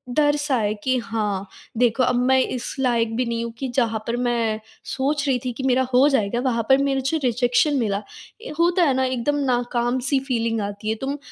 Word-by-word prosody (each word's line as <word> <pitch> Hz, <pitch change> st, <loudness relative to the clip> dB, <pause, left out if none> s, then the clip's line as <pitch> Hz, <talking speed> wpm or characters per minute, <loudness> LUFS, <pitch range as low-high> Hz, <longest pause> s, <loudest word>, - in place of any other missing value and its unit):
डर-सा 290 Hz, -2 st, +2 dB
है 210 Hz, -2 st, 0 dB
कि, 260 Hz, 0 st, +1 dB
"हाँ, 210 Hz, -4 st, -2 dB, 0.3 s
देखो, 245 Hz, +1 st, +3 dB
अब 250 Hz, 0 st, +2 dB
मैं 265 Hz, 0 st, +5 dB
इस 250 Hz, -1 st, -3 dB
लायक 230 Hz, -3 st, +1 dB
भी 250 Hz, +2 st, 0 dB
नहीं 235 Hz, 0 st, -2 dB
हूँ 235 Hz, -, -4 dB
कि 265 Hz, -, -3 dB
जहाँ 225 Hz, -4 st, +1 dB
पर 235 Hz, -, 0 dB
मैं 230 Hz, -2 st, 0 dB, 0.3 s
सोच 285 Hz, +2 st, -1 dB
रही 260 Hz, -2 st, +2 dB
थी 250 Hz, -, -1 dB
कि 265 Hz, -, -4 dB
मेरा 260 Hz, 0 st, +3 dB
हो 260 Hz, +3 st, +6 dB
जाएगा, 235 Hz, -4 st, +1 dB
वहाँ 245 Hz, -3 st, 0 dB
पर 265 Hz, -, +7 dB
मेरे 270 Hz, -1 st, 0 dB
जो 320 Hz, -, 0 dB
रिजेक्शन 245 Hz, +4 st, +2 dB
मिला।" 205 Hz, -3 st, -1 dB, 0.4 s
ए -, -, -8 dB
होता 345 Hz, +1 st, +3 dB
है 280 Hz, -5 st, +3 dB
ना, 260 Hz, -, +1 dB
एकदम 260 Hz, +3 st, -1 dB
नाकाम-सी 245 Hz, +2 st, 0 dB
फ़ीलिंग 230 Hz, -3 st, 0 dB
आती 205 Hz, +1 st, -4 dB
है, 220 Hz, -, +1 dB
तुम 275 Hz, +2 st, -2 dB
245 Hz, 205 wpm, -22 LUFS, 230-270 Hz, 0.4 s, पर